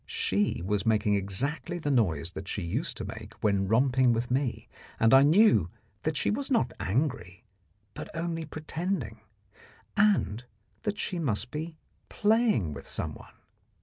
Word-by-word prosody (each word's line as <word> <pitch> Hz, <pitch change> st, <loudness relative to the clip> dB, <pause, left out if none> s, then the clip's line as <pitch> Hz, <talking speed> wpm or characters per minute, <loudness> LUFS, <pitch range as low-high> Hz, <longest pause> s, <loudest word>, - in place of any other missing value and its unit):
She 105 Hz, 0 st, 0 dB
was 105 Hz, 0 st, 0 dB
making 110 Hz, -2 st, +2 dB
exactly 125 Hz, -, -1 dB
the 145 Hz, -4 st, -2 dB
noise 85 Hz, -, +1 dB
that 95 Hz, 0 st, -8 dB
she 100 Hz, -, -3 dB
used 115 Hz, -, -2 dB
to 110 Hz, -, -4 dB
make 105 Hz, 0 st, -8 dB
when 100 Hz, -2 st, +2 dB
romping 125 Hz, +3 st, +3 dB
with 120 Hz, +2 st, -2 dB
me, 130 Hz, -1 st, -1 dB, 0.3 s
and 115 Hz, +2 st, +4 dB
I 135 Hz, -, +9 dB
knew 150 Hz, -, +5 dB, 0.3 s
that 155 Hz, +2 st, -1 dB
she -, -, +1 dB
was 275 Hz, +6 st, -2 dB
not 130 Hz, -, +1 dB
angry, 100 Hz, -, -2 dB, 0.5 s
but -, -, -7 dB
only 165 Hz, 0 st, -2 dB
pretending, 155 Hz, -, -4 dB, 0.7 s
and 195 Hz, -, +2 dB, 0.4 s
that 210 Hz, -2 st, -2 dB
she 180 Hz, -3 st, -2 dB
must 120 Hz, -, -2 dB
be 160 Hz, +1 st, -5 dB, 0.3 s
playing 210 Hz, -, +2 dB
with 70 Hz, -, -9 dB
someone. 80 Hz, -1 st, -6 dB
120 Hz, 150 wpm, -28 LUFS, 100-165 Hz, 0.7 s, I